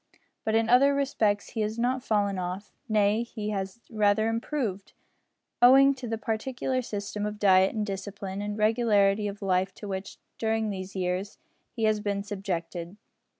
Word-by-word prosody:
But 220 - 0
in 225 0 +3
other 275 +4 +5
respects 220 -7 0
he 225 - -2
has 215 +1 -2
not 250 +2 0
fallen 200 -4 0
off 185 +3 -5 0.2
nay 210 0 +3
he 215 -3 -5
has 195 +2 -4
rather 215 0 +2
improved, 225 -4 -3 0.7
owing 270 +3 +7
to 255 -2 -7
the 225 0 -2
peculiar 255 +4 -2
system 205 -2 -5
of 210 0 -3
diet 190 0 +4
and 215 -1 -1
discipline 195 0 -5
and 205 0 -4
regularity 210 -2 +3
of 200 0 -6
life 190 0 +1
to 210 - -8
which, 190 0 -5 0.2
during 220 -1 0
these 190 0 -6
years, 185 +2 -2 0.4
he 230 - -3
has 215 -1 +3
been 200 -1 -2
subjected. 180 -3 -5
210 Hz, 160 wpm, -27 LUFS, 195-225 Hz, 0.7 s, owing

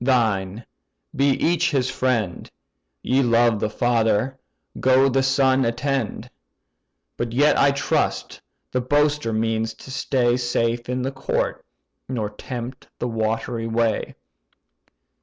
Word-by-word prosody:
thine: 110 -5 +1 0.5
be 140 +1 +3
each 165 +5 +2
his 135 -5 +1
friend; 115 -9 -1 0.5
Ye 130 +2 +2
loved 120 -3 +3
the 105 - -1
father: 115 +2 +1 0.4
go, 130 +1 +4
the 135 +1 +2
son 135 0 +3
attend. 125 +1 -2 0.9
But 120 -1 -3
yet, 145 +4 +4
I 140 - +4
trust, 140 +1 -1 0.3
the 125 - 0
boaster 145 -1 +1
means 110 0 -1
to 130 - -12
stay 125 -2 +1
Safe 120 -1 -1
in 125 0 -1
the 135 - -2
court, 135 0 -2 0.5
nor 110 -5 -2
tempt 125 +3 -7
the 125 - -2
watery 115 +1 -2
way." 115 -1 0
120 Hz, 120 wpm, -22 LUFS, 115-135 Hz, 0.9 s, go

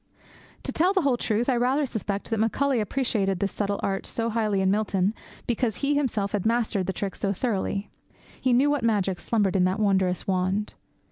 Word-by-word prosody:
To - - -1
tell 360 +4 +2
the 380 -3 +2
whole 275 -3 +3
truth, 230 0 0
I 260 - +3
rather 260 +5 +2
suspect 210 -3 -4
that 225 - 0
Macaulay 255 +4 +1
appreciated 210 -4 0
this 200 +1 0
subtle 200 -1 -2
art 195 0 -1
so 230 0 -2
highly 215 -3 0
in 190 0 +2
Milton 200 -1 +1 0.3
because 240 -2 0
he 285 +1 0
himself 225 -9 0
had 205 -3 -1
mastered 220 -4 0
the - - +1
trick 195 0 -3
so 195 -1 -1
thoroughly. 200 -2 -2 0.5
He 255 - +2
knew 265 +4 +4
what 290 -2 0
magic 200 -5 +1
slumbered 205 -5 0
in 180 -1 +4
that 185 +3 0
wondrous 190 -3 +1
wand. 190 +2 0
215 Hz, 195 wpm, -26 LUFS, 195-245 Hz, 0.5 s, knew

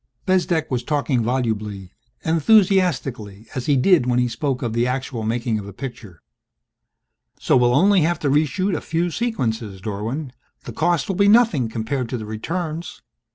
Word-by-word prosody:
Bezdek 175 -4 +1
was 125 -2 0
talking 145 -4 0
volubly, 110 -6 -2 0.3
enthusiastically 160 - +2
as 130 -4 -4
he 145 -2 +3
did 145 -1 +4
when 125 -1 +1
he 125 0 +2
spoke 130 +3 -2
of 115 -2 -2
the 120 +1 +1
actual 125 -2 -3
making 115 0 -1
of 100 - -8
a 100 - -9
picture. 110 - -9 0.6
"... - - -46
so - - +2
we'll 125 -1 +4
only 195 +4 +4
have 170 +3 +1
to 145 - -2
reshoot 170 +6 +1
a - - -3
few 170 +2 -1
sequences, 115 - -2
Dorwin. 110 +8 -4 0.3
The - - -8
cost 170 -2 +1
will 195 - -2
be 200 0 +4
nothing 205 - +4
compared 115 +3 -3
to 125 - -2
the 110 - -6
returns. 160 +9 -5
130 Hz, 170 wpm, -21 LUFS, 115-170 Hz, 0.6 s, did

